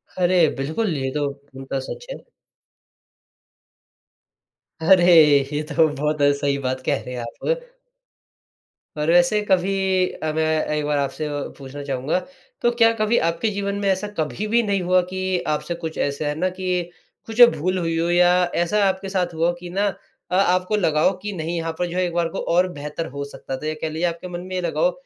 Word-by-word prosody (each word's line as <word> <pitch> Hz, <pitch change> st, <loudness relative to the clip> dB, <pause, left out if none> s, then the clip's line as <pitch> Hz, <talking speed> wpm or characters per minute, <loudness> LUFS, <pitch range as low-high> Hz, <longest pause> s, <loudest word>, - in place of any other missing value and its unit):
अरे, 180 Hz, -2 st, +4 dB
बिल्कुल, 160 Hz, +8 st, -1 dB
ये 135 Hz, 0 st, -2 dB
तो 145 Hz, -1 st, 0 dB
पूर्णतः 135 Hz, -1 st, -7 dB
सच -, -, -7 dB
है। -, -, -5 dB, 2.6 s
अरे, 175 Hz, +1 st, +5 dB, 0.5 s
ये 150 Hz, -, 0 dB
तो 155 Hz, +1 st, +2 dB
बहुत 150 Hz, +1 st, -1 dB, 0.2 s
सही 140 Hz, -1 st, 0 dB
बात 130 Hz, -1 st, -2 dB
कह 140 Hz, -, 0 dB
रहे 125 Hz, 0 st, -7 dB
हैं 120 Hz, -, -4 dB
आप -, -, -4 dB, 1.2 s
पर 150 Hz, +2 st, 0 dB
वैसे 175 Hz, +5 st, +4 dB
कभी 190 Hz, +1 st, +3 dB, 0.5 s
अब 155 Hz, 0 st, -2 dB
एक 155 Hz, -1 st, 0 dB
बार 150 Hz, -1 st, 0 dB
आपसे 140 Hz, +2 st, -2 dB
और 145 Hz, -1 st, -4 dB
पूछना 140 Hz, +1 st, -8 dB
चाहूँगा, 135 Hz, +5 st, -1 dB, 0.4 s
तो 240 Hz, -, +3 dB
क्या 230 Hz, -1 st, +4 dB
कभी 215 Hz, +2 st, +2 dB
आपके 170 Hz, +7 st, -1 dB
जीवन 200 Hz, 0 st, -2 dB
में 200 Hz, -, -1 dB
ऐसा 190 Hz, +2 st, 0 dB
कभी 155 Hz, -, -2 dB
भी 235 Hz, +2 st, +3 dB
नहीं 200 Hz, -2 st, 0 dB
हुआ 180 Hz, +1 st, +3 dB
कि 185 Hz, -1 st, -1 dB, 0.2 s
आपसे 170 Hz, +3 st, -4 dB
कुछ 160 Hz, -1 st, -6 dB
ऐसा 145 Hz, +1 st, -1 dB
है 150 Hz, -, -1 dB
ना 185 Hz, +2 st, +1 dB
की 185 Hz, -1 st, -1 dB, 0.4 s
कुछ 225 Hz, +2 st, 0 dB, 0.2 s
भूल 185 Hz, +5 st, -1 dB
हुई 165 Hz, -2 st, -1 dB
हो 170 Hz, +1 st, 0 dB
या 175 Hz, 0 st, +5 dB, 0.3 s
ऐसा 200 Hz, +5 st, +2 dB
आपके 190 Hz, 0 st, -2 dB
साथ 180 Hz, -3 st, -1 dB
हुआ 165 Hz, +2 st, +1 dB
कि 175 Hz, 0 st, -8 dB
ना 200 Hz, +3 st, 0 dB, 0.5 s
अ, -, -, +1 dB
आपको 185 Hz, +1 st, +2 dB
लगा 155 Hz, -6 st, +1 dB
हो -, -, +4 dB
की 210 Hz, -, -3 dB
नहीं 165 Hz, +2 st, -3 dB
यहाँ 165 Hz, 0 st, -2 dB
पर 180 Hz, -, +1 dB
जो 175 Hz, +1 st, -5 dB
है 185 Hz, -, +2 dB
एक 175 Hz, -, -4 dB
बार 170 Hz, -1 st, +1 dB
को -, -, -5 dB, 0.2 s
और 180 Hz, +1 st, +4 dB
बेहतर 150 Hz, +3 st, -5 dB
हो 140 Hz, -, -2 dB
सकता 135 Hz, -, -6 dB
था 155 Hz, -, -6 dB
या 155 Hz, -, -1 dB
कह 160 Hz, -, -1 dB
लीजिये 160 Hz, +3 st, -2 dB
आपके 170 Hz, +2 st, -7 dB
मन 175 Hz, -1 st, -6 dB
में 185 Hz, -, -1 dB
लगा 175 Hz, -, -2 dB
हो -, -, +4 dB
175 Hz, 195 wpm, -22 LUFS, 150-185 Hz, 2.6 s, अरे